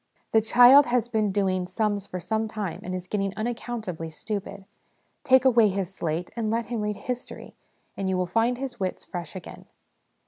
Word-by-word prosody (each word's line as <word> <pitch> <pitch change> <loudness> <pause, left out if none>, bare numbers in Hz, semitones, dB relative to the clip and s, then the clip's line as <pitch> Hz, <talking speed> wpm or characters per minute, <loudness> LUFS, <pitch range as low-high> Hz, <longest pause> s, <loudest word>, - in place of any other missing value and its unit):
The 220 - +5
child 245 +5 +7
has 240 -1 +1
been 215 -3 +1
doing 190 -2 0
sums 205 +1 -1
for 185 - -5
some 220 +4 -1
time, 210 -5 -4
and 185 +1 -4
is 180 -1 -5
getting 195 0 -2
unaccountably 220 -7 -4
stupid: 200 +3 -6 0.6
take 260 0 +5
away 235 -4 +5
his 190 -1 -3
slate 170 -1 -3
and 225 -2 -1
let 230 +1 0
him 230 0 -3
read 210 -1 -2
history, 250 -1 -6 0.4
and 195 -1 -2
you 185 -1 +1
find 230 +7 +1
his 260 -2 -6
wits 185 -1 -3
fresh 175 -1 -7
again. 185 - -9
210 Hz, 175 wpm, -26 LUFS, 185-235 Hz, 0.6 s, child